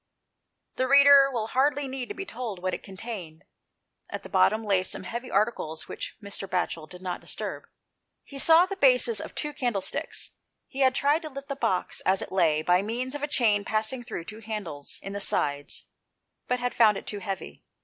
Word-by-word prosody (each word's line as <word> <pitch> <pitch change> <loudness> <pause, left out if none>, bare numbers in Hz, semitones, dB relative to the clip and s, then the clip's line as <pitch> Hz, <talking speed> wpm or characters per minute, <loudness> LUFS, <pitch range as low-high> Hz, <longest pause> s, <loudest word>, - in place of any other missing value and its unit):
The 260 - +1
reader 280 0 +8
will 225 -3 -2
hardly 280 +2 +1
need 260 -2 -5
to - - -5
be 390 - -5
told 245 - -5
what 185 +1 -2
it - - -4
contained. 190 -5 -8 0.6
At - - -6
the - - -10
bottom 220 +1 +3
lay 195 -3 +3
some 185 - -3
heavy 235 +6 -5
articles 195 -6 -1
which - - -6
Mr. 200 -1 -5
Batchel 170 -4 -2
did 180 0 -11
not 180 -1 -4
disturb. - - -5 0.6
He 280 - -7
saw 330 +4 +7
the 390 +1 -5
bases 250 - +4
of - - -9
two 300 -1 -1
candlesticks. 235 -9 -2 0.3
He 270 - -9
had 260 -2 +4
tried 290 +3 +2
to 310 - -6
lift 275 0 -9
the 275 - -2
box, 185 -9 0
as 190 0 +2
it - - -10
lay, 160 -5 +2
by 180 +2 +4
means 240 +5 -3
of 290 - -4
a 295 - -1
chain 215 -7 +2
passing 220 +4 -1
through 170 - -6
two 215 +3 -9
handles 210 -10 -4
in 195 - -6
the 200 - -3
sides, 145 -7 -1 0.6
but 250 - +1
had 245 0 -2
found 215 -4 +5
it - - -8
too 205 - -4
heavy. 195 -2 -6
225 Hz, 200 wpm, -27 LUFS, 190-265 Hz, 0.6 s, reader